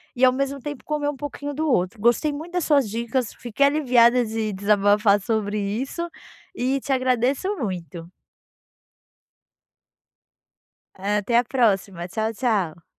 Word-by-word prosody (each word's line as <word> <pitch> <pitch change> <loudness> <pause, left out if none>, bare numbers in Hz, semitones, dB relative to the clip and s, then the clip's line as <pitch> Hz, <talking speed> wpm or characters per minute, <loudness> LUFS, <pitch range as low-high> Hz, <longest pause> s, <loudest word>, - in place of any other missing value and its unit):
e 250 - -2
ao 255 - +7
mesmo 275 +1 -2
tempo 290 0 -7
comer 300 -1 -1
um 290 - -5
pouquinho 290 +1 -5
do 310 +3 -2
outro. 195 -3 0
Gostei 240 +7 +2
muito 315 +5 -7
das 360 -2 0
suas 280 -7 +3
dicas, 235 +2 -2
fiquei 245 +4 0
aliviada 250 -4 +4
de 220 -1 -3
desabafar 205 +1 +3
sobre 210 0 -1
isso, 245 - -3 0.5
e 265 0 0
te 275 +1 -2
agradeço 260 - 0
muito. 175 - -5 2.9
Eh, 205 +2 0
até 210 +3 +1
a 240 - +4
próxima, 200 -8 0
tchau 220 +4 -2
tchau. 195 -9 -1
240 Hz, 140 wpm, -23 LUFS, 205-275 Hz, 2.9 s, ao